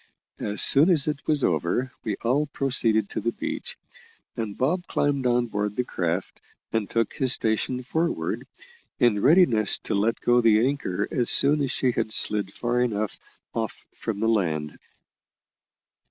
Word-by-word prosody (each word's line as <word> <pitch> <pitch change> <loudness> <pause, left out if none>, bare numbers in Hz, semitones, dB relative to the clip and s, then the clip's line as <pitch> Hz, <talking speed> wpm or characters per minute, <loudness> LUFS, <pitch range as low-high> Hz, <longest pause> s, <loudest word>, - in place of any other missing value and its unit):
As 105 0 +2
soon 145 +6 +6
as 160 -6 +3
it 150 -1 -4
was 150 -3 +2
over 85 - 0
we 105 - -2
all 135 +6 +1
proceeded 115 -7 +1
to - - -3
the 115 +2 -2
beach, - - -5 0.6
and 110 -3 -5
Bob 175 +7 -1
climbed 140 -3 0
on 120 0 +2
board 105 -2 -3
the 125 - 0
craft, 90 -5 -4 0.3
and 110 -3 -1
took 115 -2 -1
his 130 -1 +2
station 115 +3 -1
forward, 160 +6 -2 0.5
in 115 -5 +2
readiness 130 - +4
to - - -3
let 105 +3 0
go 120 0 +3
the 115 0 +4
anchor 105 -8 -2
as 120 -2 0
soon 145 +2 +5
as 140 - -1
she 130 0 0
had 110 - -3
slid 105 -3 +3
far 120 +3 -1
enough 110 -4 -2 0.3
off 115 -1 -4
from 110 -3 -5
the 110 - +1
land. 80 -9 -1
115 Hz, 160 wpm, -24 LUFS, 105-135 Hz, 0.6 s, soon